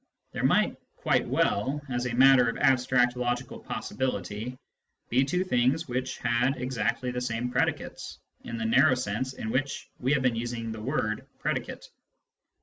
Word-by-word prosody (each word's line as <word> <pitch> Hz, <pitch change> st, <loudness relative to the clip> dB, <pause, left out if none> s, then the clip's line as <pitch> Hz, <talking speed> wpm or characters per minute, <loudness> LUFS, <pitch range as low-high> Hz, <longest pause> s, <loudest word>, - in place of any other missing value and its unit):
There -, -, -4 dB
might -, -, +3 dB, 0.2 s
quite -, -, +1 dB
well, 135 Hz, +8 st, +1 dB
as 125 Hz, -1 st, -2 dB
a 120 Hz, -, -3 dB
matter 130 Hz, -1 st, +6 dB
of 115 Hz, -, -4 dB
abstract 125 Hz, -2 st, +3 dB
logical 125 Hz, +1 st, -2 dB
possibility, 115 Hz, -1 st, -4 dB, 0.5 s
be 130 Hz, +3 st, +3 dB
two 180 Hz, +7 st, 0 dB
things 130 Hz, 0 st, +1 dB
which 125 Hz, 0 st, -3 dB
had 125 Hz, +3 st, +1 dB
exactly 125 Hz, -1 st, -1 dB
the 125 Hz, 0 st, -3 dB
same 125 Hz, 0 st, -2 dB
predicates, -, -, -2 dB, 0.3 s
in 115 Hz, -, -5 dB
the 110 Hz, -, -3 dB
narrow 130 Hz, +5 st, +5 dB
sense 125 Hz, +2 st, -2 dB
in 110 Hz, -3 st, -5 dB
which 135 Hz, +2 st, -2 dB
we 130 Hz, +4 st, +1 dB
have 140 Hz, -3 st, +1 dB
been 125 Hz, -2 st, +2 dB
using 115 Hz, -1 st, -3 dB
the 110 Hz, -1 st, -6 dB
word 110 Hz, -3 st, -2 dB
" -, -, -38 dB
pre -, -, 0 dB
dicate." -, -, -6 dB
125 Hz, 165 wpm, -28 LUFS, 115-130 Hz, 0.5 s, matter